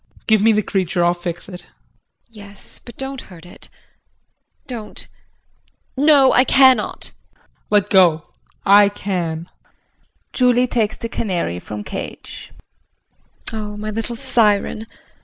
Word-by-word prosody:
JEAN. - - -29
Give 220 -2 +3
me 225 +2 +5
the 215 -1 +1
creature. 185 -3 -1
I'll 175 - +3
fix 175 0 -6
it. 180 -2 -9
JULIE. - - -25 0.6
Yes, 205 -2 -14
but 240 - -13
don't 270 0 -5
hurt 175 -2 -14
it. 175 - -14 1.0
Don't 230 -4 -7 0.9
no, 280 -1 +5
I 250 - +5
cannot. 260 -4 +3 0.3
JEAN. - - -33 0.3
Let 205 -2 +2
go. 170 -5 +3 0.3
I 200 +1 +6
can. 175 -5 -4 0.9
JULIE 250 -1 +3
[Takes 225 -4 0
the 230 - -4
canary 180 - -3
from 105 +3 -7
cage]. - - -8 1.0
Oh, 210 -1 -5
my 215 +1 -5
little 225 +2 -4
siren. 225 -3 +1
210 Hz, 130 wpm, -19 LUFS, 180-240 Hz, 1.0 s, I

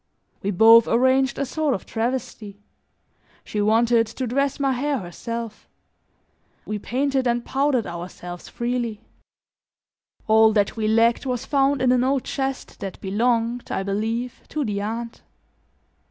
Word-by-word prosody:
We 200 - -2
both 225 +4 +7
arranged 260 +3 +2
a 280 - -1
sort 300 -1 0
of - - -7
travesty; 230 -3 -4 0.9
she 210 - -3
wanted 230 +2 +3
to 245 +3 -4
dress 275 +4 0
my 275 -1 +1
hair 280 +3 0
herself; 225 +4 -6 1.0
we 210 0 -3
painted 265 +3 0
and 240 0 0
powdered 270 -3 +1
ourselves 175 0 -8
freely; 240 -3 -3 1.2
all 220 0 +5
that 205 -2 +1
we 220 -2 -1
lacked 230 +4 +3
was 250 0 -2
found 275 -1 +2
in 250 - +4
an 250 -1 +3
old 265 0 +1
chest 270 -1 -4
that 195 -2 -6
belonged, 230 +4 0
I 190 - -1
believe, 225 +5 -3
to 300 -2 -2
the 205 -2 -2
aunt. 230 +3 -5
235 Hz, 140 wpm, -23 LUFS, 215-260 Hz, 1.2 s, both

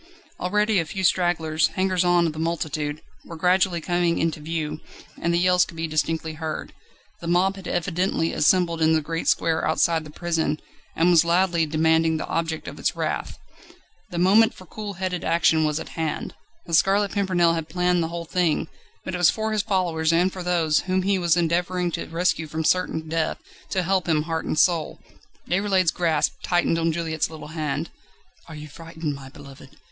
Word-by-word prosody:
Already 210 +2 +1
a 165 - -1
few 190 +4 -5
stragglers, 160 -4 +2
hangers 185 -1 +1
on 175 -1 +3
of 160 - -1
the 155 - -8
multitude, 155 -2 -2 0.2
were 165 - -9
gradually 180 +1 +2
coming 175 0 0
into 165 -1 -1
view, 155 0 -4 0.4
and 170 - +1
the 170 - +2
yells 180 0 +4
could 165 - -9
be 165 - -2
distinctly 160 0 -1
heard. 155 0 -5 0.5
The 170 - -7
mob 180 +3 +2
had 195 -2 -9
evidently 175 -1 -1
assembled 170 0 +2
in 160 0 +4
the 160 - +2
great 165 +2 -4
square 160 -1 +2
outside 160 0 +2
the 155 - -11
prison, 160 -2 -1 0.4
and 170 +2 +3
was 170 -2 +6
loudly 170 -1 +2
demanding 160 +1 +2
the - - -4
object 165 -1 -3
of - - -8
its - - 0
wrath. - - -3 0.7
The 175 - -6
moment 200 +6 +4
for 185 - -13
cool 205 +3 -7
headed 180 -1 -3
action 160 -1 +3
was 150 0 0
at - - -8
hand. 160 -2 -3 0.3
The 170 - -8
Scarlet 195 +4 +3
Pimpernel 185 -4 +2
had 165 -1 -4
planned 180 +1 +1
the 165 - 0
whole 170 0 -5
thing, 170 -2 0 0.4
but 185 - -4
it 180 - -2
was 175 - +6
for 220 0 -1
his 215 -1 +1
followers 175 -6 0
and 175 +3 +2
for 185 - -6
those, 170 -3 +2
whom 185 0 -1
he 195 0 +1
was 170 -1 +2
endeavouring 175 +1 0
to - - -4
rescue 165 -1 0
from 160 +1 -3
certain 160 -2 0
death, 160 0 -1 0.3
to 185 - 0
help 185 -1 0
him 155 -2 +2
heart 160 0 -3
and - - -2
soul. 170 -2 +2 0.5
Déroulède's 190 -2 +2
grasp 165 -4 0
tightened 175 -1 +1
on 165 0 +1
Juliette's 160 -1 -2
little 160 -2 -9
hand. 155 0 -3 0.6
"Are 160 - -9
you 150 0 -8
frightened, 160 0 -6
my 135 -1 -10
beloved?" 140 -1 -14
170 Hz, 190 wpm, -24 LUFS, 160-180 Hz, 0.7 s, was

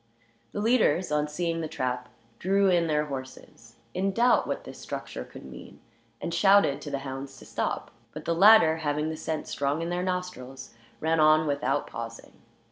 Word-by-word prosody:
The - - -4
leaders, 210 -8 +2
on 150 0 +1
seeing 165 +2 -2
the 160 - -3
trap, 125 -4 -3 0.3
drew 195 +1 +3
in 170 -2 +3
their 150 -1 +1
horses, 130 -4 -9 0.2
in 195 +2 0
doubt 240 +4 +3
what - - -3
this - - -10
structure 60 - -6
could - - -12
mean, 65 -1 -11 0.4
and 170 - -4
shouted 195 -6 +4
to 145 - -6
the 140 - -2
hounds 135 +1 -6
to - - -13
stop. - - -3 0.2
But 155 - -9
the 170 - +1
latter, 185 -3 +7
having 150 0 -1
the 160 - -3
scent 155 0 -4
strong 145 +3 -1
in 170 - -3
their 175 0 -1
nostrils, 180 -10 -5 0.3
ran 160 +1 +1
on 155 0 +5
without 140 -1 0
pausing. 115 0 -8
155 Hz, 180 wpm, -27 LUFS, 140-180 Hz, 0.4 s, latter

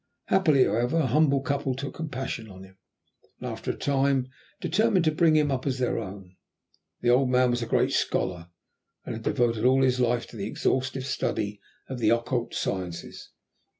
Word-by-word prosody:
Happily, 155 -9 +4
however, 120 +9 +1
a 160 - +2
humble 140 +1 +3
couple 140 -1 -1
took 140 +1 -5
compassion 135 -8 -5
on 95 -1 -11
him, 95 0 -16 0.6
and, - - -5
after - - -6
a - - -2
time, 135 -2 +1 0.3
determined 200 0 +2
to 155 - +4
bring 160 0 +3
him 150 -2 +3
up 130 +1 -2
as 130 -2 0
their 125 -2 0
own. 95 -3 -9 0.6
The 120 - +3
old 125 +1 +3
man 125 0 +3
was 120 0 -1
a 115 - -3
great - - +2
scholar, 85 -2 -1 0.6
and - - -4
had - - -7
devoted 115 -2 +1
all 130 +1 +4
his 130 -1 +2
life 120 -1 +1
to - - -12
the 100 0 -3
exhaustive 130 +3 -1
study 105 -6 -2 0.3
of 130 -2 -5
the 110 -2 +3
occult 120 +1 0
sciences. 90 -3 -4
130 Hz, 185 wpm, -26 LUFS, 115-140 Hz, 0.6 s, Happily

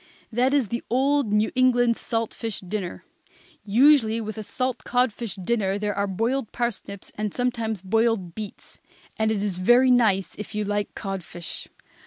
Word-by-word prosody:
That 245 +4 +2
is 275 -7 +2
the 235 - -2
old 270 -1 +2
New 210 +1 +2
England 245 -2 +4
salt 225 -1 -2
fish 225 -3 -4
dinner. 185 - -5 0.6
Usually, 230 +1 +5
with 215 -1 -5
a - - -3
salt 255 +3 -3
codfish 240 -5 0
dinner 195 0 0
there 205 0 -1
were 200 0 0
boiled 225 +5 -1
parsnips 205 -5 -4
and 210 -1 -1
sometimes 230 -5 -1
boiled 220 -3 +1
beets; 210 0 -9 0.4
and 220 0 +2
it 205 -2 -1
is 190 -3 -2
very 245 +7 +5
nice 215 -6 +3
if 210 0 -7
you 210 - 0
like 205 0 -2
codfish. 185 -4 -5
220 Hz, 160 wpm, -25 LUFS, 200-245 Hz, 0.6 s, Usually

